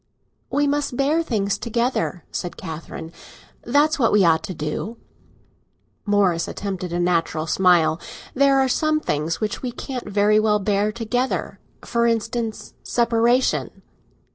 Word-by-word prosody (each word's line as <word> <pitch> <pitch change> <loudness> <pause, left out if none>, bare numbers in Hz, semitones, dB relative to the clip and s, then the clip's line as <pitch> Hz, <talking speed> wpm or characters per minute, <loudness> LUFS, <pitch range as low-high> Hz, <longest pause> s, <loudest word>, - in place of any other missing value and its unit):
"We 290 0 +1
must 285 -3 -1
bear 295 +4 +2
things 205 -10 -1
together," 235 - -1
said 175 - -4
Catherine. 160 -1 -7 0.5
"That's 295 +5 +2
what 230 - +3
we 205 -3 +5
ought 160 -1 +4
to 185 - -5
do." 155 +10 -4 1.1
Morris 195 -5 +2
attempted 190 -3 -4
a 175 - -1
natural 165 -3 0
smile. 170 -2 +3 0.3
"There 275 0 +4
are 265 - +3
some 310 +4 +1
things 155 - -2
which 215 -1 -3
we 250 - -3
can't 250 -2 -6
very 205 +1 +3
well 215 -1 +3
bear 205 +1 0
together—for 235 0 -2
instance, 230 0 -2
separation." 235 +1 +1
215 Hz, 130 wpm, -22 LUFS, 180-250 Hz, 1.1 s, we